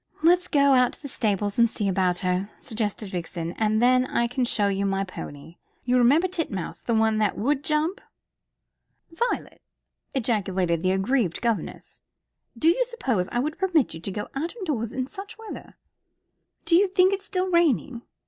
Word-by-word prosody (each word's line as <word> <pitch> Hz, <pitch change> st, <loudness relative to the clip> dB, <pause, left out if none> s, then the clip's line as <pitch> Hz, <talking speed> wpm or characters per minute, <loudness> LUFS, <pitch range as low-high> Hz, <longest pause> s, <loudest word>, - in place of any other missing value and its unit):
"Let's 355 Hz, +2 st, +4 dB
go 280 Hz, -2 st, +4 dB
out 250 Hz, -1 st, +4 dB
to -, -, -11 dB
the -, -, -4 dB
stables 205 Hz, -5 st, -1 dB
and 235 Hz, 0 st, +5 dB
see 210 Hz, -2 st, -2 dB
about 185 Hz, -2 st, +1 dB
her," 185 Hz, +2 st, 0 dB
suggested 215 Hz, -2 st, -3 dB
Vixen. 170 Hz, -2 st, -4 dB
"And 215 Hz, +1 st, +2 dB
then 255 Hz, +1 st, +4 dB
I 235 Hz, -, +1 dB
can 245 Hz, +1 st, -1 dB
show 210 Hz, -3 st, +1 dB
you 195 Hz, 0 st, 0 dB
my 195 Hz, 0 st, 0 dB
pony. 165 Hz, -3 st, -9 dB, 0.3 s
You 250 Hz, 0 st, +2 dB
remember 285 Hz, +9 st, +4 dB
Titmouse, 320 Hz, -, -4 dB
the 235 Hz, -, -1 dB
one 220 Hz, 0 st, +2 dB
that 210 Hz, -2 st, +1 dB
would 275 Hz, +6 st, 0 dB
jump?" 310 Hz, +6 st, 0 dB, 1.1 s
"Violet!" 470 Hz, +9 st, -3 dB, 0.5 s
ejaculated 190 Hz, -9 st, 0 dB
the 185 Hz, -, +1 dB
aggrieved 195 Hz, -1 st, +1 dB
governess. 230 Hz, -2 st, -3 dB, 0.6 s
"Do 310 Hz, -, +1 dB
you 430 Hz, +9 st, +3 dB
suppose 255 Hz, -, -1 dB
I -, -, -2 dB
would 305 Hz, +3 st, -3 dB
permit 345 Hz, -8 st, +2 dB
you 160 Hz, -, -7 dB
to 195 Hz, -, -5 dB
go 205 Hz, +2 st, -4 dB
out 320 Hz, -, -3 dB
of 425 Hz, -5 st, -6 dB
doors 235 Hz, -8 st, -2 dB
in 255 Hz, +1 st, -2 dB
such 395 Hz, +8 st, -9 dB
weather?" 445 Hz, -1 st, -10 dB, 0.9 s
"Do 335 Hz, -, +3 dB
you 395 Hz, +3 st, +5 dB
think 375 Hz, 0 st, +3 dB
it's 395 Hz, 0 st, -3 dB
still 370 Hz, -2 st, -1 dB
raining?" 290 Hz, -7 st, +2 dB
240 Hz, 175 wpm, -25 LUFS, 200-320 Hz, 1.1 s, and